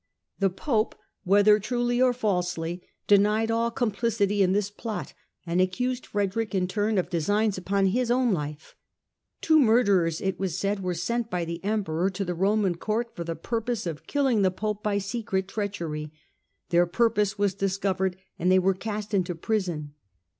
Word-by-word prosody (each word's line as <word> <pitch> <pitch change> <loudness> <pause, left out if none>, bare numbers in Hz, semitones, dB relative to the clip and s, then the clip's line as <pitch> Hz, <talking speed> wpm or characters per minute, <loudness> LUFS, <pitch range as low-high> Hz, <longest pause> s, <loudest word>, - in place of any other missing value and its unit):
The 195 0 +3
Pope, 220 - -1 0.3
whether 205 +3 +5
truly 240 +3 0
or 255 -1 +5
falsely, 180 -7 -2 0.2
denied 210 +2 +3
all 230 +1 +1
com 235 -1 -1
plicity 205 -1 0
in 185 -2 +4
this 205 +1 0
plot, 215 +1 -5 0.3
and 175 +1 +1
accused 250 +7 -1
Frederick 205 +1 -1
in 180 -1 +1
turn 210 +3 0
_of 185 - +1
designs 205 +5 +1
upon 195 +2 0
his 235 +6 +1
own 245 -2 +3
life. 150 -2 -5 0.7
Two 315 -1 +5
murderers, 200 - +3
it 190 0 -2
was 190 -3 -2
said, 200 +1 -1
were 180 -1 -2
sent 230 +7 -2
by 180 -4 -1
the 170 +1 -6
Emperor 195 -4 0
to 195 +1 -4
the 180 - -2
Roman 195 0 +1
Court 225 +5 -2
for 170 - -4
the 165 0 -4
purpose 230 +4 -3
of 160 -4 -5
killing 270 -7 +2
the 190 - +4
Pope 210 +2 -3
by 210 -1 0
secret 195 -2 -2
treachery. 170 -8 -4 0.6
Their 175 0 +4
purpose 210 +1 +1
was 200 -1 +1
discovered 190 -1 -1 0.2
and 180 +2 +2
they 185 - +6
were 190 +1 +3
cast 210 +2 -5
into 180 -3 0
prison. 165 -6 -2
200 Hz, 170 wpm, -26 LUFS, 180-220 Hz, 0.7 s, they